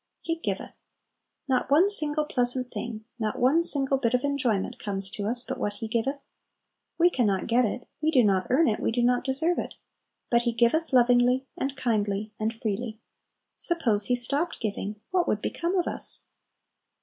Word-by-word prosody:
"He 330 0 -2
giveth." 330 - -5 0.7
Not 260 -1 0
one 310 +7 +5
single 305 -5 +3
pleasant 250 -2 +1
thing, 220 -2 -6
not 215 -1 -2
one 270 +7 +3
single 270 -4 +2
bit 240 -2 +1
of 250 - -1
enjoyment 260 -9 -1
comes 195 -1 -4
to 205 -1 -4
us 240 +2 +2
but - - -6
what 205 - -2
He 220 +2 -7
giveth. 255 +6 -2 0.7
We 350 +1 +4
can 245 -8 +1
not 195 -2 -1
get 240 +1 +2
it, 245 +3 -5
we 310 - +1
do 265 -6 +4
not 190 -3 +1
earn 300 +6 +3
it, 215 - 0
we - - -1
do 240 +1 0
not 245 0 +2
deserve 320 +6 0
it; - - -6 0.6
but 235 -1 +4
He 235 -1 -1
giveth 240 +8 +1
lovingly, 250 +1 +3
and 270 0 -4
kindly, 215 -4 -2
and 220 +1 -1
freely. 225 0 -5 0.6
Suppose 230 - +4
He 250 - +1
stopped 285 +8 0
giving, 210 -1 -4
what 365 -2 +1
would 210 - 0
become 345 - -2
of 355 - +1
us? - - +2
245 Hz, 185 wpm, -26 LUFS, 220-280 Hz, 0.7 s, one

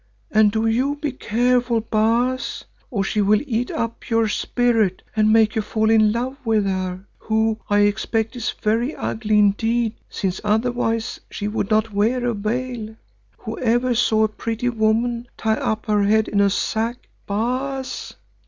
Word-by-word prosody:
And 215 -1 +5
do 220 +1 0
you 255 +6 +1
be 295 -1 -3
careful, 245 0 +1
Baas, 230 +4 0 0.3
or 200 -5 -1
she 210 +2 0
will 205 +1 +3
eat 245 -2 -1
up 230 0 -4
your 225 -1 +2
spirit 225 -3 +1
and 215 0 +3
make 220 -1 +4
you 220 - +1
fall 220 +1 0
in 215 -1 +5
love 250 +4 -3
with 220 -3 +2
her, 185 -1 -3
who, 220 0 0
I 205 0 +4
expect, 220 +3 0
is 240 -1 -2
very 230 +6 -1
ugly 215 -1 -1
indeed, 225 +3 +2 0.2
since 190 -2 -3
otherwise 225 +1 0
she 205 - -4
would 210 -1 -2
not 215 0 +1
wear 235 +5 +1
a 240 - +1
veil. 220 +1 -3 0.4
Whoever 240 +2 0
saw 220 -2 +2
a - - +4
pretty 230 +3 -3
woman 235 +1 0
tie 220 -1 +1
up 220 0 -2
her 210 -1 +2
head 215 +1 +3
in 200 - +1
a 200 - +4
sack, 225 +4 -2 0.2
Baas?" 255 +5 -3
220 Hz, 160 wpm, -21 LUFS, 215-240 Hz, 0.4 s, And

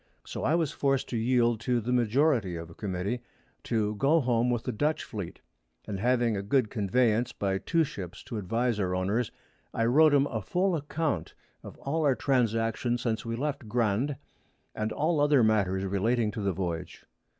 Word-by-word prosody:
So - - -5
I 150 - +3
was 165 -4 +1
forced 135 -2 0
to - - -3
yield 120 -1 +2
to 120 +1 0
the 120 +3 -2
Majority 120 - +2
of 85 0 -7
a - - -11
Committee 100 +5 -3 0.4
to 110 -2 0
go 145 +8 +4
home 120 -3 +1
with 120 -2 0
the 125 - -2
Dutch 150 +8 0
Fleet, 100 -6 -7 0.4
and 100 -2 -4
having 120 0 +2
a 100 - -2
good 110 +2 +1
Conveyance 115 +2 +1
by 95 -1 -1
two 165 +8 +1
Ships 95 - -7
to 115 - -6
advise 115 +3 0
our 90 -2 0
Owners, 100 +6 0 0.4
I 115 - +1
wrote 150 +5 +5
'em 140 0 +4
a 115 -6 -3
full 180 - +1
Account 150 - -2 0.3
of - - -11
all 155 +3 -2
our 140 -3 +3
Transactions 120 -2 +1
since 115 -1 -2
we 115 - -2
left 135 -3 -3
Grande, 120 +4 +1 0.6
and 110 0 -2
other 145 -4 +3
Matters 100 -3 +2
relating 105 +4 +1
to 105 - -5
the 100 -1 +1
Voyage. 90 -2 -4
115 Hz, 180 wpm, -28 LUFS, 105-135 Hz, 0.6 s, wrote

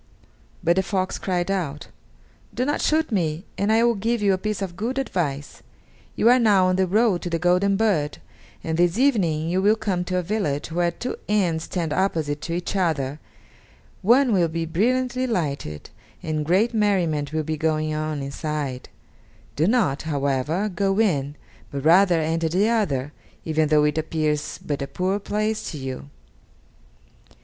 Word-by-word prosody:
But 170 +2 +3
the - - +5
fox 185 0 -2
cried 180 0 -1
out: 155 -7 -3 0.7
"Do 250 +3 0
not 290 - -1
shoot 315 -2 +1
me, 170 -3 -1
and 200 +2 0
I 225 +1 +4
will 235 0 +4
give 230 +3 -1
you 200 -1 +4
a - - +1
piece 210 0 -2
of 175 -3 -5
good 235 +7 -3
advice! 150 - -3 0.5
You 225 - +2
are 250 +1 +6
now 205 -5 +4
on 185 0 +2
the 190 0 +2
road 205 -1 +2
to 175 - -4
the 170 - 0
golden 180 +3 +2
bird, 195 -9 +1 0.5
and 160 0 -2
this 175 +2 +3
evening 185 - +2
you 180 +3 +1
will 210 +2 +4
come 190 -5 -2
to 185 0 -1
a 180 - 0
village 165 -7 -2
where 175 +1 +1
two 245 +9 -5
inns 175 -6 +1
stand 165 -4 -2
opposite 155 -6 -1
to 165 - -4
each 175 +3 -3
other 155 -6 0 0.8
one 245 +4 +4
will 175 -4 +3
be 165 +1 -3
brilliantly 250 +9 0
lighted, 140 - -3 0.3
and 155 -1 -2
great 200 +8 +2
merriment 175 -9 +1
will 155 0 -1
be 155 +1 -2
going 155 0 0
on 155 -2 -3
inside; 140 -2 -4 0.7
do 155 +4 +2
not, 210 - +2
however, 145 +5 -1
go 195 0 0
in, 145 -10 +1 0.4
but 140 0 -5
rather 175 +1 +5
enter 160 +1 0
the 190 +6 +2
other, 150 - 0 0.3
even 155 -1 +1
though 150 -1 +4
it 150 +1 +1
appears 155 -2 -2
but 145 -2 -2
a 140 - -3
poor 190 +5 -1
place 215 +2 -2
to 155 - -6
you." 135 0 -6
175 Hz, 175 wpm, -23 LUFS, 155-205 Hz, 0.8 s, are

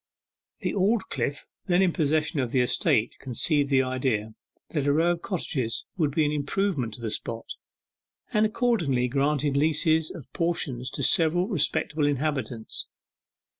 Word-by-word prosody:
The - - -1
Aldclyffe 190 - 0 0.2
then 180 0 +4
in 180 -3 +2
possession 155 -1 +1
of 125 -3 -1
the 130 - +3
estate 120 -2 +1
conceived 140 +3 +1
the 135 -2 +4
idea 130 -4 -1 0.4
that 145 -3 -1
a - - +4
row 165 +3 +3
of 170 -1 -3
cottages 130 - -2
would 155 -5 +1
be 150 +2 +1
an 145 - +1
improvement 145 - -1
to 120 - -12
the 110 -2 -3
spot, 115 +1 -3 0.9
and 215 - +3
accordingly 215 - +1
granted 145 +2 0
leases 160 +2 +2
of 155 - -9
portions 140 -7 -1
to 140 - -5
several 175 - +3
respectable 150 - +1
inhabitants. 130 -6 -2
145 Hz, 145 wpm, -26 LUFS, 130-165 Hz, 0.9 s, then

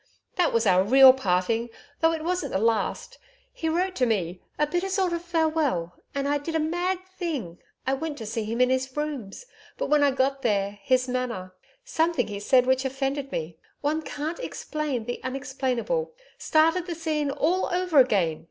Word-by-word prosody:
That 355 -3 +2
was 230 0 +1
our 185 -2 +5
real 260 +5 +8
parting, 225 0 0 0.3
though 325 0 +4
it 320 -1 -3
wasn't 360 +2 -2
the - - +2
last. 225 0 -1 0.3
He 325 - -2
wrote 365 +3 0
to 250 - +2
me 180 -5 -1 0.2
a 300 - +3
bitter 350 +5 -2
sort 380 -2 +1
of 340 - -2
farewell. 315 - 0 0.2
And 280 0 -1
I 290 0 +1
did 325 +3 -5
a - - +2
mad 350 +4 -1
thing. 260 - -3 0.3
I 265 - +1
went 295 +2 -3
to 225 - -6
see 220 +1 -3
him 225 +3 -3
in 250 0 +4
his 260 +1 -1
rooms. 295 - -4 0.3
But - - -3
when 300 -1 +5
I 285 - +5
got 270 +1 0
there, 205 -4 0
his 255 -1 +2
manner 240 -8 -3 0.3
something 335 -9 +1
he 200 -1 -5
said 250 +4 +4
which 260 +1 +2
offended 270 +1 -2
me 160 0 -4 0.2
one 305 +2 0
can't 310 +4 -5
explain 300 - -3
the 245 - -4
unexplainable 265 - -2 0.2
started 330 +3 +2
the 340 - -3
scene 310 -3 -1
all 335 +7 +1
over 360 -4 +2
again. 190 -11 +3
275 Hz, 185 wpm, -26 LUFS, 230-325 Hz, 0.3 s, real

